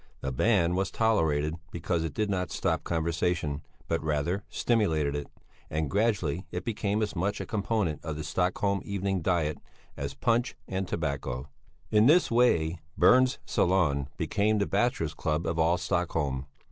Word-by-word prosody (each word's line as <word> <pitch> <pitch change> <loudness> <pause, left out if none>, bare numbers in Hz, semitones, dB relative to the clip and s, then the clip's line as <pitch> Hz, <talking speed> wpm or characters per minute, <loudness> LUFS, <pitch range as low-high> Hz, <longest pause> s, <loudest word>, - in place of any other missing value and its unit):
The 70 - -2
band 90 - +2
was 95 +1 0
tolerated 80 -8 +1
because 85 0 -1
it 80 -3 -4
did 105 - 0
not 90 -3 -1
stop - - -1
conversation, 80 -3 -1 0.3
but 85 -1 -1
rather 80 +6 0
stimulated 80 -12 +1
it, 75 -1 -4 0.4
and 80 -1 -2
gradually 95 -5 0
it 90 +1 -5
became 105 -1 0
as 105 - -3
much 100 +4 -1
a - - -4
component 105 -7 -1
of 80 -2 -4
the 75 - -5
Stockholm 95 +5 0
evening 95 -1 -1
diet, 80 -4 0 0.4
as 70 +1 -4
punch 120 0 +1
and 95 0 -2
tobacco. 70 -5 -3 0.4
In 105 +2 +5
this 170 0 +5
way 90 -9 +3 0.2
Berns' 130 0 +5
Salon 75 -7 +1
became 105 +1 +1
the 100 - +1
bachelors' 90 -12 0
club 80 0 -1
of 80 0 -1
all 85 +2 +3
Stockholm. 75 -7 -1
90 Hz, 155 wpm, -28 LUFS, 75-100 Hz, 0.4 s, In